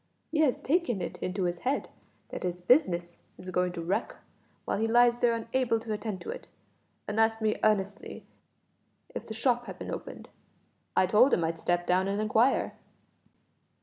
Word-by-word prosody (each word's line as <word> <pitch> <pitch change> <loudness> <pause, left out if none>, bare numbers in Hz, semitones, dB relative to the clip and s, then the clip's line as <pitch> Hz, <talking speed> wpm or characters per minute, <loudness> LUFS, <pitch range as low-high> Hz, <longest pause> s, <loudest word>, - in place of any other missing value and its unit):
He 310 - 0
has 295 -5 +3
taken 310 - 0
it 175 0 -5
into 185 +2 -2
his 175 -1 -1
head 265 +7 -1 0.4
that - - -6
his 180 -1 -3
business 175 - +2 0.2
is 185 0 -8
going 180 0 +1
to 170 -1 -5
wreck 180 +4 -1 0.5
while - - -1
he 225 - +1
lies 240 +1 +4
there 235 -1 +3
unable 230 0 0
to 220 -1 -4
attend 210 -2 -4
to - - -5
it, - - -8 0.6
and 210 +1 -2
asked 225 0 +3
me 215 -1 0
earnestly 200 -2 0 0.9
if - - -6
the 220 - -6
shop 240 +1 +1
had - - -7
been - - -6
opened. - - -7 0.7
I - - +6
told 210 +9 +5
him 170 - -1
I'd 165 0 -2
step 175 +1 0
down 185 +2 +2
and 200 +1 -1
inquire." 220 +5 +2
215 Hz, 180 wpm, -29 LUFS, 180-240 Hz, 0.9 s, I